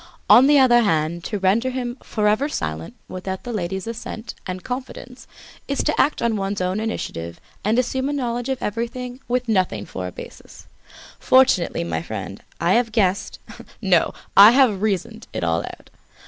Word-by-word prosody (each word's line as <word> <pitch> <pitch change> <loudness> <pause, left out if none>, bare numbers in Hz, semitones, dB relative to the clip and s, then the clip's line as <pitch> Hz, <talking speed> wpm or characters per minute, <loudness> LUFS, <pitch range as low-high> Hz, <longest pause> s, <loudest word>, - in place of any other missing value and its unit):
On 260 +3 +8
the 295 0 +5
other 245 -3 +6
hand, 165 -4 0
to 210 - -2
render 200 +6 +2
him 250 -2 -4
forever 215 +6 0
silent 80 - -4
without 190 +1 -6
the 245 - -5
lady's 190 -1 -3
assent 230 0 -6
and 185 -1 -5
confidence 255 0 -7 0.4
is 280 - -1
to 305 - +2
act 295 - 0
on 230 -2 +1
one's 195 0 -2
own 185 +2 -1
initiative 85 - -4 0.2
and 215 +3 +1
assumes 260 +2 0
a - - -2
knowledge 245 -2 -2
of 265 -1 -3
everything 245 +3 -4
with 250 +1 -1
nothing 185 - 0
for 90 -1 -6
a - - -7
basis. - - -12 0.5
Fortunately, 255 - +3
my 80 -1 -3
friend, 100 0 -7 0.2
I 170 +3 +2
have 235 -1 +2
guessed, 195 -4 0 0.4
no, 190 -5 +2 0.2
I 205 +4 +9
have 245 -8 +3
reasoned 220 +2 -2
it - - -3
all 85 0 +1
out. - - -10
220 Hz, 170 wpm, -22 LUFS, 180-245 Hz, 0.5 s, I